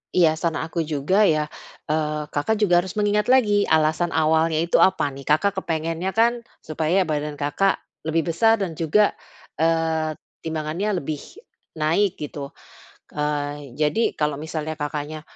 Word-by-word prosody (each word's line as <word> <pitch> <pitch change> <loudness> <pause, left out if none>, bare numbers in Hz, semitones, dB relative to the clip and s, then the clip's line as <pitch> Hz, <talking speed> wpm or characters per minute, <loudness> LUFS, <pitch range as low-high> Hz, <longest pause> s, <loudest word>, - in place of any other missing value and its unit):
Iya, 165 -3 +5
saran 165 -2 0
aku 165 +1 -2
juga 155 +5 +1
ya, 155 -7 +3 0.4
eee, 150 0 -1
Kakak 180 +10 0
juga 180 -5 +4
harus 190 +3 -8
mengingat 210 +1 +1
lagi 210 -6 +4
alasan 160 +2 +2
awalnya 160 0 +2
itu 170 +2 +2
apa 190 - +4
nih? 135 - -9
Kakak 155 +8 +2
kepengennya 165 +2 -2
kan, 235 +1 +3 0.2
supaya 160 +4 +1
badan 150 -2 -3
Kakak 150 +7 +1 0.2
lebih 160 +1 0
besar 225 +6 +4
dan 195 -5 -3
juga, 165 +7 +2 0.5
eee, 160 -1 +1 0.2
timbangannya 160 +6 -2
lebih 150 -2 -4 0.6
naik 170 +6 +1
gitu. 145 -1 -6 0.6
Eee, 145 -1 -3
jadi, 155 +9 +1
kalau 150 -1 +1
misalnya 155 0 -4
Kakaknya, 150 +1 -4
160 Hz, 140 wpm, -23 LUFS, 150-185 Hz, 0.6 s, Iya